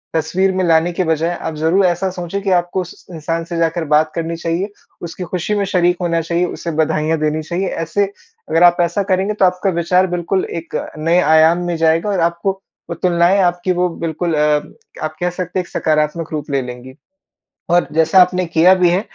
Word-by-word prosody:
तस्वीर 180 +5 +1
में 185 0 -1
लाने 165 +1 +3
के 185 - 0
बजाए 165 +2 0
आप 160 - -4
ज़रूर 165 +5 +2
ऐसा 180 +2 0
सोचें 180 +2 -5
कि 195 - -2
आपको 175 +2 -3
उस 180 - -11
इंसान 165 +1 -3
से 170 -1 -5
जाकर 165 0 0
बात 155 0 +2
करनी 165 0 -3
चाहिए, 170 +5 -2 0.3
उसकी 170 +2 -6
खुशी 180 +4 -2
में 200 -1 0
शरीक 180 -2 +1
होना 170 -1 0
चाहिए, 170 +2 0
उसे 170 -1 -5
बधाइयाँ 155 +1 0
देनी 155 +1 0
चाहिए। 180 +4 -2
ऐसे 165 +5 -1 0.4
अगर 165 - +3
आप 175 0 +6
ऐसा 175 +4 0
करेंगे 190 +3 +1
तो 195 -2 +2
आपका 180 +2 +1
विचार 180 +1 +2
बिल्कुल 175 +2 -1
एक 165 - -10 0.2
नए 165 +3 +2
आयाम 160 +1 +5
में 175 - -1
जाएगा 165 +4 +2
और 195 - 0
आपको 170 +3 -2 0.4
वो 170 - -3
तुलनाएँ 175 +2 +2
आपकी 175 0 0
वो 180 +1 +1 0.2
बिल्कुल 165 +1 -2
अ, 150 0 +2 0.4
आप 155 0 -4
कह 180 - 0
सकते 180 +1 -4
हैं - - -1
एक - - -17
सकारात्मक 155 +1 -1
रूप 150 -1 -4
ले 140 -1 +1
लेंगी। 125 +1 -9 0.8
और 175 -1 +3
जैसा 160 +4 +4
आपने 180 0 +2
किया 170 +3 +4
भी 180 -2 +3
है, 180 +3 +1
170 Hz, 205 wpm, -17 LUFS, 160-180 Hz, 0.8 s, आप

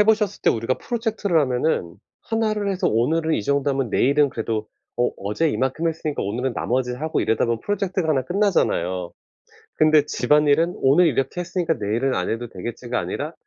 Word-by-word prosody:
해 210 - +6
보셨을 215 -2 +1
때 - - +4
우리가 115 +3 0
프로젝트를 220 -7 -1
하면은 125 - 0 0.3
1 225 -1 0
를 205 -2 -1
해서 190 - 0
오늘은 155 +8 +1
이 - - -1
정도 140 +3 +1
하면 135 -5 -1
내일은 140 +5 +3
그래도 110 -1 -3 0.3
'어 120 - +2
어제 105 +12 0
이만큼 135 +6 -1
했으니까 155 -2 -3
오늘은 120 +5 -2
나머지 125 0 -1
하고.' 155 +5 -2
이러다 110 - +1
보면 115 -1 -1
프로젝트가 190 -4 -2
1 135 -4 +2
끝나잖아요. 125 - 0 0.6
근데 155 -1 +4
'집안일은 150 +6 +2
오늘 150 +6 +4
이렇게 135 +4 -1
했으니까 175 -1 -1
내일은 115 +5 -1
안 90 - -1
해도 120 +2 -3
되겠지.'가 120 +5 -4
아니라 155 +3 -4
140 Hz, 420 characters per minute, -22 LUFS, 120-170 Hz, 0.6 s, 해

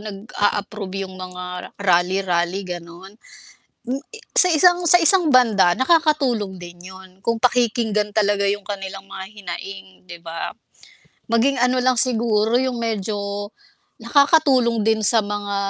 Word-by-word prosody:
nag-a-approve 205 -1 -3
yung 190 - -10
mga 180 0 -8
rally, 185 +1 +2
rally, 175 +1 -1
gano'n. 175 +2 -9 0.8
M 260 - 0 0.4
sa 365 -1 +6
isang 355 +2 +4
sa 350 +1 +6
isang 335 -2 +4
banda 220 -8 +4
nakakatulong 260 - +1
din 175 0 -10 0.2
'yun 190 0 -14
kung 230 -1 -1
pakikinggan 225 -4 +1
talaga 205 -1 +1
yung 200 +1 0
kanilang 195 -1 -7
mga 190 0 -8
hinaing, 195 0 -8 0.2
'di 175 -1 -11
ba? 165 0 -6 0.8
Maging 260 +4 +2
ano 250 +1 +1
lang 255 0 +2
siguro 225 -3 +1
yung 260 -2 -2
medyo 205 -2 -4 0.5
nakakatulong 275 -7 +2
din 220 0 +2
sa 225 +2 +2
mga 205 0 -4
205 Hz, 130 wpm, -21 LUFS, 190-250 Hz, 0.8 s, sa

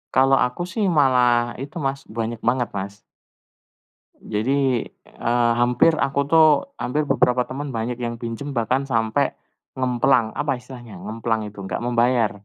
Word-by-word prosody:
Kalau 135 +1 +5
aku 125 +7 -5
sih 220 - -1 0.2
malah 125 -3 +3
itu, 140 +3 -8
Mas, 135 0 -2
banyak 115 0 -2
banget, 120 0 +1
Mas. 100 +1 -6 1.2
Jadi, 130 +3 0
eee, 120 0 -1
hampir 125 +7 +4
aku 140 -2 0
tuh 160 +1 +6 0.3
hampir 150 +4 -2
beberapa 125 -1 +2
temen 140 +2 -5
banyak 115 +1 -3
yang 120 -1 -4
pinjam 120 +5 -5
bahkan 130 +2 0
sampai 115 +1 0 0.5
ngemplang. 125 -2 +2
Apa 145 -4 -1
istilahnya, 120 -3 -11
ngemplang 110 -1 -3
itu, 105 -1 -9
enggak 95 - -3
membayar. 120 -1 +2
125 Hz, 140 wpm, -22 LUFS, 115-135 Hz, 1.2 s, tuh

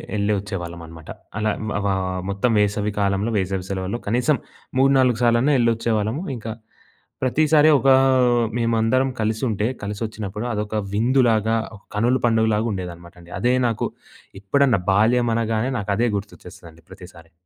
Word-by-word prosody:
యెళ్లి 105 0 +1
వచ్చేవాళ్ళమన్నమాట. 85 -5 -8 0.3
అలా 105 0 0 0.3
ఆహ్, 95 -2 -1
మొత్తం 100 +5 0
వేసవి 105 0 0
కాలంలో, 100 +2 0
వేసవి 95 -1 -2
సెలవుల్లో 95 +4 -3
కనీసం 125 +7 +2 0.4
మూడు, 135 +1 +4
నాలుగు 125 -3 +2
సార్లన్నా 120 +5 +3
యెళ్లి 120 -1 +3
వచ్చేవాళ్ళము. 115 - -1
ఇంక 115 -1 -8 0.8
ప్రతిసారి 155 +3 +4
ఒక 135 - +2 0.7
మేమందరం 115 +3 +1
కలిసి 110 +2 -1
ఉంటే, 105 0 -1 0.2
కలిసి 100 +1 -5
వచ్చినప్పుడు 105 0 -6
అదొక 105 0 -3 0.2
విందులాగా, 115 -1 +2 0.4
కనులు 120 +4 +1
పండుగలాగా 110 -1 +1
ఉండేదన్నమాట 85 -2 -8
అండి. 85 0 -16
అదే 125 +1 +2
నాకు 115 -2 -1 0.5
ఎప్పుడన్నా, 125 +2 +2
బాల్యం 115 +4 +3
అనగానే 115 +2 -1
నాకు 100 0 -3
అదే 120 +2 +2
గుర్తొచ్చేస్తదండి, 85 -4 -11
ప్రతిసారి. 90 -3 -14
110 Hz, 130 wpm, -22 LUFS, 100-120 Hz, 0.8 s, మూడు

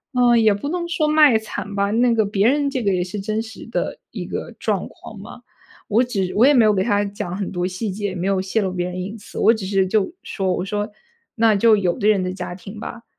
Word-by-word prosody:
呃， 245 -1 +5
也 220 -2 +4
不 205 +9 -4
能 345 0 -2
说 310 -2 0
卖 300 -6 +6
惨 215 -2 -6
吧。 200 0 +1
那 235 +2 +3
个 220 -2 +2
别 200 +1 +1
人 285 +1 +2
这 260 -4 -3
个 200 - +2
也 180 - 0
是 190 +3 -6
真 215 +2 -2
实 220 -1 -11
的 - - -3
一 - - -6
个 - - -5
状 - - -2
况 - - -12
嘛， - - -11 0.5
我 225 +4 +3
只 195 -7 -2
我 230 +5 +5
也 295 - +6
没 240 -5 +5
有 215 - +4
给 190 -1 +1
他 205 -2 +1
讲 190 -3 -5
很 200 - -4
多 180 -1 -1
细 190 +3 -4
节， 205 +2 -5
也 190 - -6
没 180 0 -3
有 195 -1 +1
泄 190 +4 -1
露 190 -2 -1
别 180 0 -2
人 180 0 -5
隐 200 +5 -5
私。 - - -12
我 225 - +5
只 210 -5 -5
是 195 -1 +2
就 205 - 0
说 190 -2 -2
我 180 - -2
说 205 +2 -3 0.4
那 225 -2 +4
就 220 +1 +5
有 180 -4 0
的 205 - +1
人 200 -3 +3
的 185 0 -3
家 180 -1 -6
庭 200 +3 -10
吧， 230 +1 -8
205 Hz, 280 characters per minute, -21 LUFS, 190-230 Hz, 0.5 s, 卖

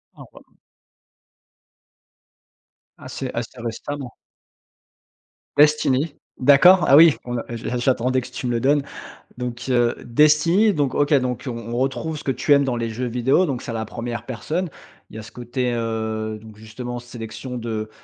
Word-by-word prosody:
Ah - - -12
ouais. - - -19 2.4
Ah - - -11
c'est 130 - -5
assez 120 +1 -5
récemment. 125 +3 -5 1.5
Destiny? 150 0 +3 0.2
D'accord. 150 +8 +6
Ah 140 - +7
oui! 160 -1 +8
On 120 0 -3
a - - -3
j'a 120 +1 -4
j'attendais 130 +1 +1
que - - -9
tu 125 - -5
me - - 0
le 115 -1 -1
donnes. 140 +1 +3 0.5
Donc, 125 0 -5
heu, 120 -1 +2
Destiny, 155 - +4
donc 145 -4 0
OK, 145 +1 +2
donc 125 -3 +1
on - - -2 0.2
on 120 - -2
retrouve 145 +4 -2
ce - - -10
que 135 - +1
tu 145 - -2
aimes 140 -1 +6
dans 125 -2 -1
les 115 -1 -2
jeux 125 +3 -3
vidéos, 125 +9 +2
donc 135 -6 -3
c'est - - -6
à - - -5
la 110 -1 -3
1re 120 +1 -6
personne. 155 +8 -3 0.4
Il - - -14
y - - -6
a - - -8
ce 115 - -12
côté, 125 +1 -3
heu, 110 -1 -3
donc 110 -1 -14
justement, 120 +3 -7
sélection 120 +1 -8
de 110 -2 -4
125 Hz, 175 wpm, -22 LUFS, 115-140 Hz, 2.4 s, oui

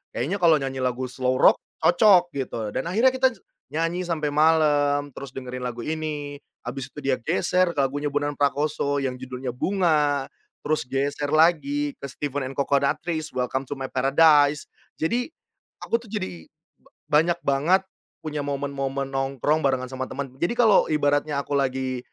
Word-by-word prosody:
kayaknya 160 +12 -1
kalau 165 -3 +6
nyanyi 135 -1 -4
lagu 125 0 -1
slow 130 0 -1
rock - - +5 0.2
cocok, 175 +1 +5
gitu. 115 -6 -4
Dan - - -2
akhirnya 230 +8 +4
kita 260 0 +3
j - - -20 0.3
nyanyi 165 +3 -1
sampai 165 -4 -2
malam, 145 -2 +3
terus 135 -2 -8
dengerin 125 -1 -7
lagu 120 -1 -4
ini, 150 +1 -4 0.3
habis 135 -1 -5
itu 145 - -9
dia 135 -2 +1
geser 170 +7 +1
ke 145 - -4
lagunya 145 +2 0
Bondan 145 0 -1
Prakoso 145 0 0
yang 130 -2 -2
judulnya 125 -1 -6
"Bunga", 150 -4 +1 0.3
terus 155 0 -1
geser 140 +3 -2
lagi 145 -3 +2
ke - - -25
Steven& 140 -1 -4
Coconuttreez, 140 +4 -1
"Welcome 130 +1 -2
to 135 +1 -7
My 130 - -3
Paradise". 145 +2 +4 0.3
Jadi, 245 - -1 0.5
aku 230 0 -1
tuh 220 - -15
jadi 90 - -5 0.6
ba 150 - +6
banyak 170 +2 0
banget 155 +8 +2 0.4
punya 150 -1 -4
momen-momen 140 -1 -3
nongkrong, 135 +3 0
barengan 130 -3 0
sama 130 0 -4
temen. 135 -2 -5
Jadi 175 +8 0
kalau 225 -4 +5
ibaratnya 145 -1 +1
aku 145 - -16
lagi 130 -1 -1
145 Hz, 155 wpm, -24 LUFS, 135-160 Hz, 0.6 s, kalau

